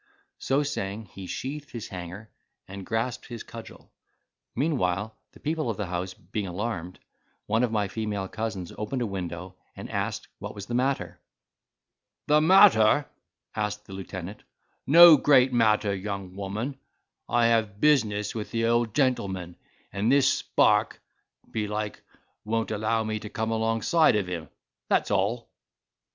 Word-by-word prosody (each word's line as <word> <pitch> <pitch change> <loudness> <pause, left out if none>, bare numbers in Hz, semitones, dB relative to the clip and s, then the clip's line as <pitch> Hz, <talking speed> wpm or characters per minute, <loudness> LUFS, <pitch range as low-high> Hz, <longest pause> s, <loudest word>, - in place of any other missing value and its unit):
So 135 +2 +1
saying, 105 -6 -4
he 95 -1 -8
sheathed 145 +6 -5
his 115 -3 -7
hanger, 90 +4 -8 0.4
and 95 0 -9
grasped 115 +2 -2
his 120 -3 -7
cudgel. - - -12 0.6
Meanwhile 110 - 0 0.2
the - - -16
people 155 -3 -2
of 110 - -2
the 105 - -2
house 90 +1 -4
being 95 +3 -5
alarmed, 90 -2 -4 0.5
one 110 +2 +1
of 120 - +1
my 105 -2 0
female 105 -2 -3
cousins 110 -5 -5
opened 120 +4 -2
a - - -1
window, 90 -2 -6 0.2
and - - -8
asked - - -3
what - - -7
was 100 -1 -7
the 120 - -6
matter. 120 -9 -1 1.1
"The 150 +1 +4
matter!" 150 - +6 0.5
answered 105 0 -3
the 95 - -11
lieutenant; 95 0 -7 0.5
"no 165 +2 +10
great 130 -2 +4
matter, 105 -3 +3
young 95 -1 -5
woman; 105 +8 -4 0.5
I 120 0 +3
have 110 -3 +1
business 110 -9 +2
with 105 -3 -5
the 115 +1 0
old 115 -1 +1
gentleman, 95 - 0 0.4
and 105 +5 +1
this 140 -1 +5
spark, - - +2 0.5
belike, 105 -1 -3 0.4
won't 115 +1 -1
allow 110 +1 0
me 110 0 -2
to 105 - -8
come 110 +1 -2
alongside 115 +7 +3
of 105 -2 +1
him," 85 -4 -5 0.4
that's - - +2
all. 105 +4 0
110 Hz, 145 wpm, -27 LUFS, 100-120 Hz, 1.1 s, no